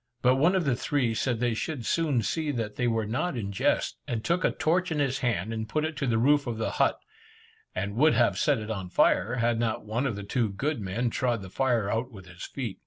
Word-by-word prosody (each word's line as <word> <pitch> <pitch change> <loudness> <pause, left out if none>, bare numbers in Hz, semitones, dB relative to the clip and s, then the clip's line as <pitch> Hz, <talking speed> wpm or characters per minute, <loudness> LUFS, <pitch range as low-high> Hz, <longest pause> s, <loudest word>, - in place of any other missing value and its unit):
But 130 +1 +5
one 165 +7 +4
of 185 -3 +1
the 135 -3 +2
three 130 -2 0
said 120 +1 -1
they 120 -1 +1
should 125 +1 -4
soon 145 -7 +1
see 155 - -1
that 115 -6 -3
they 125 - 0
were 115 -2 0
not 125 +8 -2
in 100 -3 -3
jest, 100 - 0
and 115 -2 -2
took 175 +1 +1
a - - +4
torch 180 +3 0
in 160 - 0
his 135 -2 0
hand, 115 -4 -1
and 110 -1 -4
put 155 0 0
it 160 0 -3
to 140 -2 -1
the 115 -2 +2
roof 140 +4 +3
of 115 -2 -3
the 110 - -2
but, - - +3 0.8
and 100 +2 -2
would 155 +6 +4
have - - +3
set 145 -3 +3
it 110 0 -5
on 95 -4 -4
fire, 115 +6 +3
had 120 -1 +1
not 115 -2 -1
one 120 +6 -1
of 115 - -2
the 100 - -6
two 110 +2 0
good 135 +6 -2
men 110 +5 -1
trod 120 -5 0
the 95 - -10
fire 120 -5 +1
out 115 +3 -1
with 95 -5 -12
his 90 -1 -9
feet. 120 -8 -5
120 Hz, 250 wpm, -27 LUFS, 110-140 Hz, 0.8 s, But